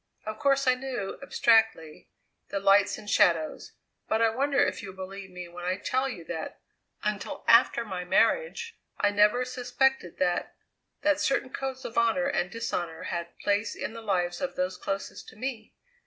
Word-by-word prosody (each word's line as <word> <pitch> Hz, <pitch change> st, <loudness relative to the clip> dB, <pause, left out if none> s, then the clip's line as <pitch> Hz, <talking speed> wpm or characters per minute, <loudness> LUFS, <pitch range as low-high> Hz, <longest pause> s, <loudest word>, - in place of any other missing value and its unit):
Of 215 Hz, 0 st, -5 dB
course 275 Hz, -1 st, +3 dB
I 255 Hz, -, +5 dB
knew, 255 Hz, -6 st, -4 dB
abstractly, 225 Hz, -, +2 dB, 0.4 s
the 200 Hz, -, -2 dB
lights 195 Hz, 0 st, +4 dB
and 210 Hz, -, -12 dB
shadows; 165 Hz, -5 st, +2 dB, 0.3 s
but 220 Hz, -, +1 dB
I 225 Hz, -1 st, +4 dB
wonder 275 Hz, +4 st, 0 dB
if 285 Hz, -, +2 dB
you 200 Hz, -, -7 dB
will 190 Hz, -, -10 dB
believe 190 Hz, +1 st, -8 dB
me 180 Hz, -1 st, -8 dB
when 175 Hz, +1 st, -10 dB
I 185 Hz, +1 st, 0 dB
tell 260 Hz, +5 st, 0 dB
you 180 Hz, -10 st, -7 dB
that, 160 Hz, 0 st, -6 dB, 0.4 s
until 210 Hz, -1 st, -3 dB
after 230 Hz, 0 st, +5 dB
my 185 Hz, -4 st, -4 dB
marriage, 460 Hz, -, +1 dB, 0.2 s
I 205 Hz, -, +3 dB
never 210 Hz, +5 st, +4 dB
suspected 250 Hz, -4 st, 0 dB
that 175 Hz, -1 st, 0 dB, 0.5 s
that 300 Hz, 0 st, +3 dB
certain 270 Hz, -1 st, 0 dB
codes 265 Hz, -1 st, -4 dB
of 235 Hz, -1 st, 0 dB
honour 235 Hz, +4 st, +2 dB
and 180 Hz, -10 st, 0 dB
dishonour 175 Hz, -7 st, -3 dB
had 170 Hz, 0 st, -5 dB
place 205 Hz, +2 st, 0 dB
in -, -, -5 dB
the 230 Hz, -, -8 dB
lives 180 Hz, -5 st, -1 dB
of 275 Hz, -, -3 dB
those 185 Hz, 0 st, -1 dB
closest 195 Hz, +1 st, -5 dB
to -, -, -16 dB
me? 230 Hz, -1 st, -5 dB
215 Hz, 175 wpm, -28 LUFS, 185-255 Hz, 0.5 s, I